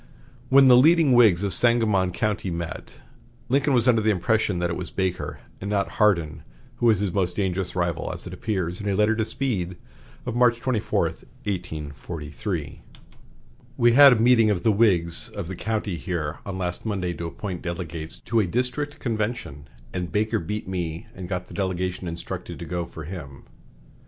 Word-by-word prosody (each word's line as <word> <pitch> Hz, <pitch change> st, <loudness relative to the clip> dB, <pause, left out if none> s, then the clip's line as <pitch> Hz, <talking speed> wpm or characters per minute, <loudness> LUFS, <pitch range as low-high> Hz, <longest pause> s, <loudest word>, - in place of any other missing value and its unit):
When 135 Hz, 0 st, +7 dB
the 125 Hz, -, +8 dB
leading 155 Hz, +3 st, +5 dB
Whigs 105 Hz, -7 st, +5 dB
of 100 Hz, -3 st, +1 dB
Sangamon 110 Hz, -5 st, +3 dB
County 105 Hz, 0 st, -1 dB
met, 85 Hz, -1 st, -5 dB, 0.6 s
Lincoln 140 Hz, +1 st, +2 dB
was 120 Hz, 0 st, +2 dB
under 115 Hz, -3 st, +4 dB
the 110 Hz, -, +2 dB
impression 105 Hz, 0 st, +1 dB
that 85 Hz, -1 st, -1 dB
it -, -, -2 dB
was 90 Hz, -1 st, -5 dB
Baker 95 Hz, -2 st, -3 dB, 0.2 s
and 100 Hz, -, -4 dB
not 100 Hz, -1 st, -1 dB
Hardin 85 Hz, -7 st, +2 dB, 0.4 s
who 120 Hz, -, +2 dB
was 110 Hz, -3 st, +5 dB
his 100 Hz, -2 st, -2 dB
most 90 Hz, -3 st, 0 dB
dangerous 95 Hz, -2 st, -2 dB
rival, 85 Hz, -2 st, -1 dB
as -, -, -8 dB
appears 90 Hz, -1 st, -3 dB
in 105 Hz, -, -2 dB
a 100 Hz, -, +1 dB
letter 105 Hz, +2 st, +3 dB
to 110 Hz, -, 0 dB
Speed 100 Hz, -8 st, -2 dB, 0.5 s
of 120 Hz, -, -3 dB
March 120 Hz, -1 st, +4 dB
24, 120 Hz, -3 st, 0 dB, 0.4 s
1843: 80 Hz, -, -5 dB, 1.0 s
"We 120 Hz, 0 st, +5 dB
had 140 Hz, +2 st, +9 dB
a 115 Hz, -, 0 dB
meeting 115 Hz, -1 st, +5 dB
of 95 Hz, -4 st, 0 dB
the 110 Hz, -, +4 dB
Whigs 90 Hz, -6 st, +2 dB
of 100 Hz, -5 st, -6 dB
the 95 Hz, -, -5 dB
county 105 Hz, -3 st, -2 dB
here 80 Hz, -4 st, -3 dB
on 95 Hz, -2 st, -4 dB
last 90 Hz, -2 st, -3 dB
Monday 95 Hz, -5 st, -2 dB
to 85 Hz, -1 st, -5 dB
appoint 90 Hz, +1 st, -6 dB
delegates 85 Hz, -2 st, -5 dB
to 115 Hz, -, 0 dB
a 105 Hz, -, +2 dB
district 125 Hz, +8 st, -2 dB
convention, 105 Hz, -, -3 dB, 0.3 s
and 90 Hz, -2 st, -3 dB
Baker 105 Hz, +4 st, +1 dB
beat 105 Hz, +6 st, -4 dB
me 85 Hz, -3 st, -4 dB
and 90 Hz, -2 st, -8 dB
got 90 Hz, -1 st, -3 dB
the -, -, -13 dB
delegation 95 Hz, -1 st, -2 dB
instructed 85 Hz, 0 st, -6 dB
to -, -, -7 dB
go 85 Hz, -1 st, -3 dB
for 80 Hz, -, -9 dB
him. 75 Hz, -5 st, -8 dB
95 Hz, 175 wpm, -24 LUFS, 85-110 Hz, 1.0 s, had